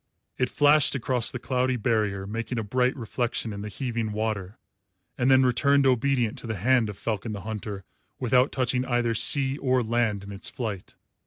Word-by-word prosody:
It 125 Hz, -, +1 dB
flashed 145 Hz, -1 st, +4 dB
across 125 Hz, -2 st, 0 dB
the -, -, -5 dB
cloudy 125 Hz, +1 st, 0 dB
barrier, 105 Hz, -4 st, 0 dB
making 115 Hz, +4 st, -4 dB
a 115 Hz, -, -1 dB
bright 125 Hz, +4 st, +1 dB
reflection 120 Hz, -2 st, -3 dB
in 100 Hz, -, -6 dB
the 105 Hz, -, -5 dB
heaving 115 Hz, -1 st, -3 dB
water, 105 Hz, -2 st, -3 dB, 0.6 s
and 125 Hz, +1 st, +1 dB
then 130 Hz, 0 st, +6 dB
returned 140 Hz, +3 st, +3 dB
obedient 125 Hz, -2 st, +1 dB
to -, -, -9 dB
the 110 Hz, -, -2 dB
hand 115 Hz, +3 st, +2 dB
of 100 Hz, -, -7 dB
Falcon 110 Hz, 0 st, -3 dB
the 100 Hz, -, -6 dB
Hunter 105 Hz, -2 st, -6 dB, 0.4 s
without 125 Hz, +1 st, +3 dB
touching 125 Hz, -1 st, 0 dB
either 120 Hz, -2 st, +1 dB
sea 135 Hz, +4 st, +1 dB
or 130 Hz, -2 st, +1 dB
land 110 Hz, -3 st, 0 dB
in 100 Hz, -, -9 dB
its 100 Hz, -, -3 dB
flight. 105 Hz, -7 st, -6 dB
120 Hz, 180 wpm, -26 LUFS, 105-130 Hz, 0.6 s, then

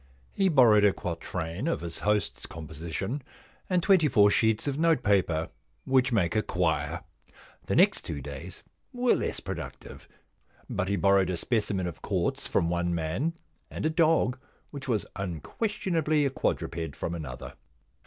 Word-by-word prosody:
He 195 Hz, -1 st, +2 dB
borrowed 120 Hz, -, +6 dB
a 100 Hz, -2 st, +5 dB
quatrain 85 Hz, -, -4 dB
of 165 Hz, -, 0 dB
his 85 Hz, -1 st, -5 dB
host's 105 Hz, 0 st, 0 dB
composition, 85 Hz, -, -5 dB, 0.5 s
and 180 Hz, -2 st, +2 dB
twenty 190 Hz, -6 st, +5 dB
four 105 Hz, -6 st, +5 dB
sheets 110 Hz, -1 st, +2 dB
of 140 Hz, +1 st, -1 dB
notepaper, 100 Hz, -, +2 dB, 0.4 s
which 130 Hz, -1 st, +3 dB
make 100 Hz, -5 st, +1 dB
a 110 Hz, -, +3 dB
quire. 80 Hz, -7 st, -1 dB, 0.6 s
The -, -, 0 dB
next -, -, +5 dB
two 70 Hz, -, -5 dB
days 70 Hz, +6 st, -8 dB, 0.3 s
were 250 Hz, -1 st, +2 dB
less -, -, -1 dB
productive, -, -, -8 dB, 0.6 s
but 100 Hz, -1 st, -2 dB
he 100 Hz, -, +1 dB
borrowed 100 Hz, -2 st, +3 dB
a 90 Hz, -, -1 dB
specimen 100 Hz, -2 st, 0 dB
of 85 Hz, -3 st, -6 dB
quartz -, -, -1 dB
from 85 Hz, -, +1 dB
one 85 Hz, 0 st, 0 dB
man, 85 Hz, -, -1 dB, 0.4 s
and -, -, -4 dB
a 160 Hz, -, +2 dB
dog, 160 Hz, -6 st, +3 dB, 0.3 s
which 140 Hz, -2 st, -7 dB
was 110 Hz, -5 st, 0 dB
unquestionably 155 Hz, -, -1 dB
a 135 Hz, -, +1 dB
quadruped, 80 Hz, -, -2 dB
from 85 Hz, -, -3 dB
another. 75 Hz, -7 st, -6 dB
100 Hz, 150 wpm, -28 LUFS, 85-140 Hz, 0.6 s, borrowed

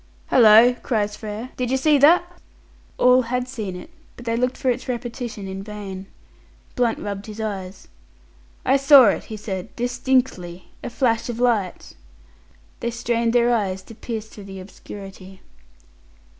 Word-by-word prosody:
"Hallo," 230 Hz, +1 st, +7 dB
cries 210 Hz, -3 st, -1 dB
Frere, 215 Hz, +4 st, -7 dB
"did 250 Hz, -1 st, -2 dB
you 265 Hz, -, +1 dB
see 290 Hz, +2 st, +3 dB
that?" 350 Hz, +4 st, +4 dB, 0.6 s
All 250 Hz, +1 st, +5 dB
had 250 Hz, +1 st, -2 dB
seen 215 Hz, -8 st, -5 dB
it, 315 Hz, -, -10 dB, 0.2 s
but 240 Hz, -, -12 dB
they 230 Hz, -1 st, 0 dB
looked 250 Hz, +2 st, -1 dB
for 260 Hz, -2 st, +1 dB
its 245 Hz, +1 st, -5 dB
repetition 240 Hz, -4 st, -5 dB
in 190 Hz, 0 st, -6 dB
vain. 195 Hz, -2 st, -8 dB, 0.7 s
Blunt 240 Hz, -2 st, +1 dB
rubbed 200 Hz, 0 st, -6 dB
his 215 Hz, 0 st, -9 dB
eyes. 195 Hz, -3 st, -5 dB, 0.8 s
"I 265 Hz, +2 st, +4 dB
saw 275 Hz, -4 st, +8 dB
it," -, -, -2 dB
he 215 Hz, -, -7 dB
said, 195 Hz, -1 st, -6 dB
"distinctly. 245 Hz, -8 st, -1 dB
A -, -, -4 dB
flash 235 Hz, -2 st, 0 dB
of 235 Hz, -1 st, -4 dB
light." 225 Hz, -7 st, -1 dB, 0.8 s
They 235 Hz, -, -2 dB
strained 235 Hz, 0 st, -1 dB
their 240 Hz, 0 st, +3 dB
eyes 190 Hz, -4 st, -2 dB
to 225 Hz, -, -13 dB
pierce 220 Hz, -1 st, -6 dB
through 210 Hz, -2 st, -12 dB
the 195 Hz, -1 st, -9 dB
obscurity. 190 Hz, 0 st, -11 dB
230 Hz, 155 wpm, -22 LUFS, 200-250 Hz, 0.8 s, saw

